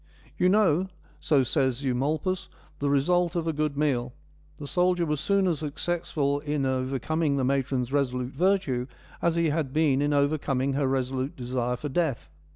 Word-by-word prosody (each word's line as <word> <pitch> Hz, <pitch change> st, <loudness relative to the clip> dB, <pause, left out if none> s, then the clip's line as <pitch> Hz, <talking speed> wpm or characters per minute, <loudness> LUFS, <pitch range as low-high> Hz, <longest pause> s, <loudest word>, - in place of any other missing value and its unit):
' -, -, -27 dB
You 180 Hz, -, +4 dB
know,' 190 Hz, -3 st, +3 dB, 0.3 s
so 145 Hz, -4 st, +3 dB
says 130 Hz, 0 st, 0 dB
Eumolpus, 150 Hz, +8 st, -1 dB, 0.2 s
* 150 Hz, -, -30 dB
the 140 Hz, -, 0 dB
result 175 Hz, +5 st, +2 dB
of 170 Hz, -2 st, -1 dB
a 165 Hz, -, 0 dB
good 150 Hz, -1 st, -1 dB
meal: 125 Hz, -5 st, 0 dB, 0.4 s
the 145 Hz, -, -7 dB
soldier 180 Hz, +3 st, +1 dB
was 150 Hz, -2 st, -1 dB
soon 200 Hz, +4 st, +2 dB
as 170 Hz, -5 st, 0 dB
successful 150 Hz, -2 st, -1 dB
in 145 Hz, -1 st, -2 dB
overcoming 135 Hz, +4 st, 0 dB
the 135 Hz, -, 0 dB
matron's 130 Hz, -1 st, 0 dB
resolute 125 Hz, -2 st, 0 dB
virtue 175 Hz, -10 st, +1 dB, 0.3 s
as 170 Hz, -1 st, +2 dB
he 170 Hz, -1 st, +2 dB
had 150 Hz, -4 st, -2 dB
been 150 Hz, -3 st, +2 dB
in 145 Hz, 0 st, +1 dB
overcoming 140 Hz, -2 st, +1 dB
her 140 Hz, 0 st, +1 dB
resolute 130 Hz, +1 st, -1 dB
desire 125 Hz, -1 st, -2 dB
for 150 Hz, -, -5 dB
death.' 130 Hz, -, -1 dB
145 Hz, 170 wpm, -27 LUFS, 130-160 Hz, 0.4 s, You